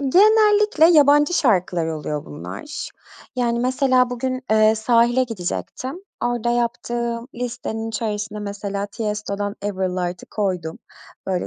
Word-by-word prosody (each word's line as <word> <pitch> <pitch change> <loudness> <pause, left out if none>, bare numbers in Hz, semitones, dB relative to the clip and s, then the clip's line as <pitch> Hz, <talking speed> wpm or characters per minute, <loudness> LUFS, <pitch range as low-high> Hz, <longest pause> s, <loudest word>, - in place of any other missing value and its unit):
Genellikle 420 +4 +5
yabancı 295 +3 +5
şarkılar 180 - +2
oluyor 150 -1 -4
bunlar. 295 - -7 0.5
Yani, 235 -1 +1
mesela, 255 -1 +2
bugün, 255 +1 -3
eee, 215 0 +5
sahile 240 +3 +3
gidecektim. 250 - -5 0.2
Orada 240 -1 0
yaptığım 235 0 -2
listenin 235 -2 -4
içerisine 210 -1 -3
mesela 200 0 -4
Tiesto'dan 205 -1 -3
Ever 190 -2 -1
Light'ı 180 -1 -4
koydum. 180 -6 -2 0.5
Böyle 185 -2 -1
230 Hz, 110 wpm, -21 LUFS, 200-255 Hz, 0.5 s, Genellikle